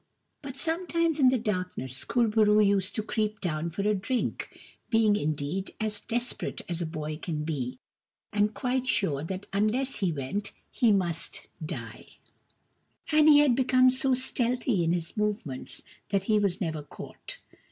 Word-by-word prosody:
But 270 -2 -8
sometimes 335 0 0
in 260 -2 +7
the 255 - +2
darkness 180 - -3
Kur 240 -2 +2
bo 220 +1 +2
roo 210 0 +5
used 200 -2 +2
to 215 - -1
creep 215 -1 -1
down 165 -2 -2
for 195 +4 -3
a 210 - +4
drink, 230 +5 -2 0.3
being, 225 -3 +4
indeed, 155 +2 -2
as 215 -1 -2
desperate 240 +2 -3
as 175 -1 -3
a 170 - -1
boy 155 -1 -4
can 155 -2 -3
be, 135 -5 -3 0.6
and 210 0 +2
quite 255 +2 -1
sure 150 - +1
that 190 +4 -5
unless 225 +7 +1
he 190 -4 +1
went 155 +8 -4 0.2
he 235 -3 +3
must 175 -5 -1 0.2
die; 115 -7 -8 0.9
and 305 0 +6
he 295 - +9
had 275 -5 +4
become 255 0 +5
so 260 0 +2
stealthy 245 -5 +1
in 165 - +2
his 170 -2 -2
movements 210 - -3 0.3
that 195 -1 +1
he 215 +1 +3
was 195 -2 0
never 160 -6 -2
caught. 145 - -10
205 Hz, 165 wpm, -28 LUFS, 165-245 Hz, 0.9 s, he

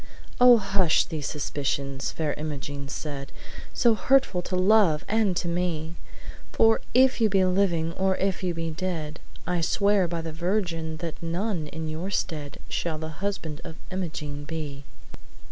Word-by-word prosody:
'Oh, 245 -1 +9
hush 195 -5 +2
these 155 -4 -4
suspicions!' 140 -2 -2
Fair 155 -3 -1
Imogene 145 -2 -5
said, 140 -1 -5 0.4
"So 235 -2 +4
hurtful 255 -5 +3
to 185 - -3
love 185 -4 +4
and 215 -5 +2
to 175 - -1
me! 170 -2 -1 0.6
For 225 0 +4
if 260 -1 +5
you 220 - +5
be 190 -1 +3
living, 180 -3 +1
or 190 +1 +1
if 195 0 0
you 180 -2 -1
be 165 0 -2
dead, 155 -2 -4 0.3
I 180 -1 0
swear 200 +2 +3
by 170 0 -3
the 160 -1 -5
Virgin 170 -2 -1
that 165 - -6
none 170 0 -2
in 160 +1 -5
your 160 +5 -4
stead 150 -7 -3
Shall 165 -2 -2
the 160 0 -5
husband 170 -6 -3
of 160 - -8 0.2
Imogene 150 -6 -4
be!' 145 -3 -6
170 Hz, 155 wpm, -26 LUFS, 155-195 Hz, 0.6 s, Oh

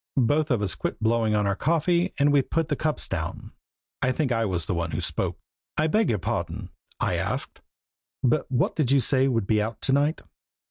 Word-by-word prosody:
Both 145 +5 +2
of 120 -6 +1
us 95 - -1
quit - - -4
blowing 110 -1 +2
on 105 -1 +2
our 100 -1 +1
coffee 170 - +1
and 145 0 +3
we 140 - +5
put 165 +4 -1
the 145 - +1
cups 155 +2 -1
down. - - -4 0.5
I 130 - +2
think 130 0 0
I 115 -1 +1
was 90 -5 -1
the - - -1
one 85 -1 -1
who - - -3
spoke. - - -2 0.4
"I 155 - +3
beg 215 +8 +2
your 110 - +2
pardon," - - -3 0.3
I - - 0
asked, - - -3 0.6
"but 135 +4 +1
what 125 - +1
did 150 -6 +1
you 140 0 +5
say 130 +2 +2
would 115 -6 +1
be 105 +1 +2
out 110 +1 -3
to 135 - +1
night?" 145 +3 +2
130 Hz, 215 wpm, -26 LUFS, 110-150 Hz, 0.6 s, we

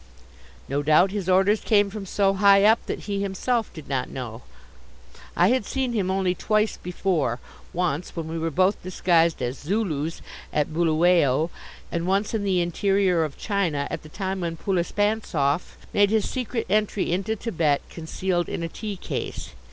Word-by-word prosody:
No 140 +2 -1
doubt 155 +6 +4
his 195 -3 -3
orders 195 +3 +4
came 205 -3 +3
from 200 -2 -6
so 195 +1 +2
high 200 0 +5
up 220 +2 +5
that - - -3
he 200 -1 -3
himself 220 +4 -1
did 155 -4 -11
not 130 -2 -2
know. 120 -3 -6 1.0
I - - +5
had 255 -1 +2
seen 260 +2 -2
him 200 -5 0
only 190 -1 +1
twice 215 +3 +1
before 170 -9 -1 0.3
once 175 -2 -2
when 165 -2 -4
we 165 +1 -4
were 165 +1 -1
both 185 +5 +2
disguised 170 -5 +2
as 125 +2 -3
Zulus 165 -4 -2 0.3
at 150 +1 0
Buluwayo, 165 -2 +3 0.4
and 170 +1 -2
once 195 +4 +1
in 220 -2 -1
the 190 -3 +2
interior 185 0 +2
of 150 -3 -5
China, 175 -9 -1
at - - -4
the 155 - -13
time 190 +2 -3
when 165 -1 -3
Poulispantzoff 180 -5 0 0.2
made 205 -1 +4
his 220 -1 +1
secret 250 -2 -3
entry 205 -2 +1
into 195 +5 0
Thibet 165 -10 0
concealed 175 +2 -2
in 170 - -3
a - - -1
tea 210 +3 -5
case. - - -5
185 Hz, 165 wpm, -24 LUFS, 160-205 Hz, 1.0 s, high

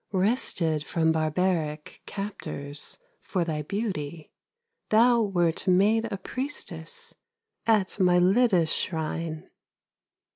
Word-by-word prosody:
Wrested 185 - +1
from 160 +1 +1
barbaric 155 -1 -1
Captors 150 -8 -4 0.2
for 180 -3 -1
thy 155 -2 -2
beauty, 165 -4 -4 0.6
Thou 235 +2 +5
wert 175 -4 +1
made 215 +5 +3
a 200 - -2
priestess 190 - -5 0.5
At 215 -2 +2
Mylitta's 180 0 +4
shrine. 160 0 -3
180 Hz, 85 wpm, -27 LUFS, 160-205 Hz, 0.6 s, Thou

